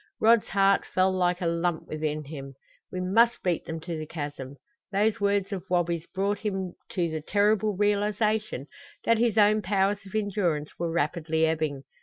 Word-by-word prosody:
Rod's 230 0 +5
heart 195 +1 +3
fell 185 0 +1
like 180 -1 +1
a - - -1
lump 170 0 -1
within 155 0 -3
him. 135 -2 -8 0.4
We 185 - -4
must 225 +6 +3
beat 175 -3 0
them 165 0 -5
to 170 0 -5
the 155 - -6
chasm! 145 -4 -6 0.4
Those 210 +2 +1
words 200 -1 +1
of 190 -3 -4
Wabi's 170 -2 0
brought 200 +2 -1
him 190 -4 -3 0.2
to 175 -2 +1
the 155 -1 -3
terrible 210 +3 +2
realization 210 - 0 0.4
that 230 -1 +3
his 230 -2 +2
own 215 0 +5
powers 200 +1 +1
of 195 - -10
endurance 185 -8 0
were 170 0 -1
rapidly 160 0 0
ebbing. 155 -4 -1
185 Hz, 170 wpm, -27 LUFS, 160-205 Hz, 0.4 s, Rod's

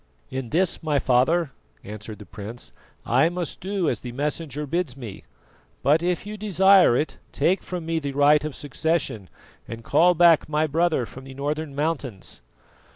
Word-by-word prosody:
"In 130 -3 -4
this, 175 +5 +1
my 155 -2 0
father," 140 +5 +2 0.3
answered 105 +1 -8
the 105 - -12
prince, 105 +4 -8 0.3
"I 130 +7 +3
must 175 -2 -4
do 190 -2 -1
as 120 - 0
the 125 - -7
Messenger 150 +1 -3
bids 150 -3 -2
me; 115 -7 -9 0.6
but 150 +4 +4
if 180 +1 -1
you 210 +1 -6
desire 195 - +5
it, 155 - -2
take 185 +3 +1
from 180 -3 -6
me 165 0 0
the 140 -2 -4
right 145 +2 +4
of 155 -3 -4
succession 145 - -2 0.4
and 115 0 -8
call 180 +7 +4
back 170 -2 +5
my 155 +1 +1
brother 160 -3 +1
from 130 +3 -12
the 135 0 -10
northern 145 +1 -3
mountains." 140 - -3
150 Hz, 165 wpm, -24 LUFS, 130-170 Hz, 0.6 s, desire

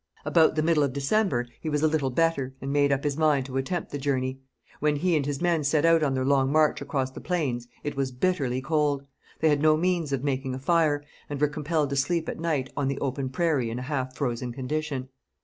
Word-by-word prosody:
About 160 -2 +4
the 155 - +1
middle 160 -2 +3
of 140 -3 +1
December 140 - +1 0.2
he 160 - -3
was 150 0 0
a - - +6
little 150 -3 0
better, 135 -2 0
and 135 +1 -4
made 145 -1 +3
up 140 0 +1
his 145 -1 -1
mind 150 -4 +3
to 135 0 -4
attempt 165 +6 -2
the 145 - -4
journey. 130 -1 -1 0.4
When 150 0 +2
he 175 +3 +1
and 150 - +2
his 145 +3 -3
men 170 -3 +2
set 145 +2 +2
out 165 -1 +5
on 140 -3 +1
their 130 0 0
long 135 -1 +3
march 155 -1 +3
across 140 -2 -2
the - - -9
plains, 135 -10 -2 0.2
it 145 - -3
was 135 -1 -1
bitterly 130 -3 0
cold. 145 -2 +1 0.4
They 160 - +4
had 145 -1 +2
no 155 0 +5
means 170 -3 0
of 135 -1 -1
making 135 -2 -1
a - - -6
fire, 150 -1 +2 0.3
and 145 -1 -4
were 150 - +4
compelled 150 0 -1
to - - 0
sleep 160 +4 0
at - - -4
night 155 -6 -1
on 140 -2 0
the 135 0 -1
open 135 0 -2
prairie 140 -4 0
in 115 - -4
a 125 - -4
half 130 -2 -3
frozen 125 -3 -2
condition. 135 +1 -3
145 Hz, 235 wpm, -26 LUFS, 135-155 Hz, 0.4 s, a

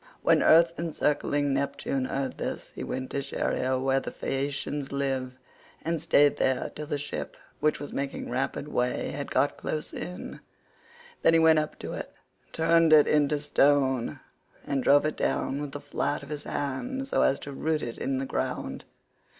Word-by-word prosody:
When - - +5
earth 165 +1 +5
encircling 145 -3 0
Neptune 140 -1 -1
heard 135 0 -3
this - - -4
he - - -6
went 130 0 -4
to 140 - -1
Scheria 130 -1 -1
where 135 +1 +2
the - - -5
Phaeacians 140 +1 -3
live, 135 -2 -1 0.5
and 165 -1 -1
stayed 145 -3 +4
there 130 -1 0
till 150 0 -6
the 145 - -1
ship, 145 +1 -5 0.2
which 155 +1 +1
was 145 - -7
making 140 0 -3
rapid 130 +3 -2
way, 125 -4 -1
had - - -5
got - - +1
close 155 -1 -4
in. 180 - -6 0.8
Then - - +5
he - - +6
went 160 -1 +6
up 155 0 -3
to - - -6
it, - - -6 0.4
turned 165 0 +4
it 150 -2 +8
into 150 0 +3
stone, 140 -3 +2 0.5
and 135 -2 -1
drove 145 +3 +5
it 155 - -1
down 140 +2 0
with 145 -2 -5
the 145 - -6
flat 145 0 -2
of 140 - -11
his 150 -1 -5
hand 250 - -3
so - - +1
as 135 - +3
to 140 - -7
root 155 +2 -1
it 115 - -5
in 135 -1 -1
the 135 - -2
ground. - - -3
145 Hz, 175 wpm, -28 LUFS, 135-155 Hz, 0.8 s, it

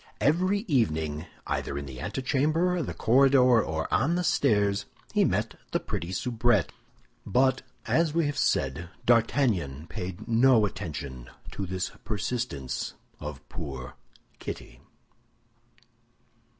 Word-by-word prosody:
Every 180 - +2
evening, 80 - 0 0.2
either 70 - -2
in 70 - -4
the 65 -2 -8
antechamber, 155 - +1
the 140 - -4
corridor, 130 -1 +5
or 80 0 -3
on 160 +6 +3
the 180 - 0
stairs, 105 -10 +2 0.3
he - - +4
met - - 0 0.2
the - - +3
pretty 85 +2 -4
soubrette. 115 - +1 0.5
But, 130 +5 +2 0.2
as 165 -1 +2
we 165 +1 +1
have 145 0 -1
said, 80 - 0 0.2
D'Artagnan 115 - +2
paid 90 +4 -6
no 115 -1 +5
attention 70 -9 -6 0.2
to 95 - -4
this 95 +1 -2
persistence 100 - -3 0.2
of - - -7
poor 65 -2 -6 0.5
Kitty. - - -7
110 Hz, 115 wpm, -28 LUFS, -, 0.5 s, corridor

